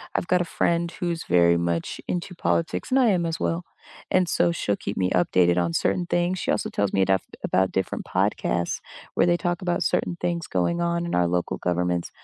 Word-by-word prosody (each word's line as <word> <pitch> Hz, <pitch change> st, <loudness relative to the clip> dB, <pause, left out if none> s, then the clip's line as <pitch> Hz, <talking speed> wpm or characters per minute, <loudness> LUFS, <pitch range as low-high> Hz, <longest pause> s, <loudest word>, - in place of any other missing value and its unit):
I've -, -, 0 dB
got 180 Hz, -1 st, +3 dB
a -, -, -1 dB
friend 170 Hz, 0 st, 0 dB
who's 170 Hz, -2 st, -2 dB
very 85 Hz, -1 st, +4 dB
much 85 Hz, -1 st, -2 dB
into 180 Hz, +1 st, -3 dB
politics, 165 Hz, -1 st, -1 dB
and 265 Hz, +1 st, +3 dB
I 245 Hz, -4 st, +5 dB
am 175 Hz, -4 st, +1 dB
as 165 Hz, -, -3 dB
well, 170 Hz, +1 st, -1 dB, 0.4 s
and 185 Hz, -1 st, +3 dB
so 170 Hz, -, +2 dB
she'll 105 Hz, -11 st, -1 dB
keep 100 Hz, -, -5 dB
me 95 Hz, -1 st, +1 dB
updated 90 Hz, 0 st, +3 dB
on 85 Hz, -1 st, 0 dB
certain 175 Hz, -, 0 dB
things. 175 Hz, +1 st, 0 dB
She -, -, -3 dB
also -, -, 0 dB
tells 100 Hz, -1 st, 0 dB
me 95 Hz, -1 st, +2 dB
aduff 95 Hz, -1 st, +3 dB, 0.2 s
about 95 Hz, 0 st, +1 dB
different 95 Hz, -, -2 dB
podcasts 85 Hz, 0 st, 0 dB, 0.3 s
where -, -, +3 dB
they 175 Hz, 0 st, +3 dB
talk 175 Hz, 0 st, -2 dB
about 175 Hz, -1 st, 0 dB
certain 175 Hz, -, 0 dB
things 170 Hz, -1 st, -2 dB
going 170 Hz, -, 0 dB
on 170 Hz, 0 st, 0 dB
in 170 Hz, -, -4 dB
our 90 Hz, -1 st, +3 dB
local 90 Hz, 0 st, -1 dB
governments. 90 Hz, 0 st, -1 dB
165 Hz, 210 wpm, -25 LUFS, -, 0.4 s, I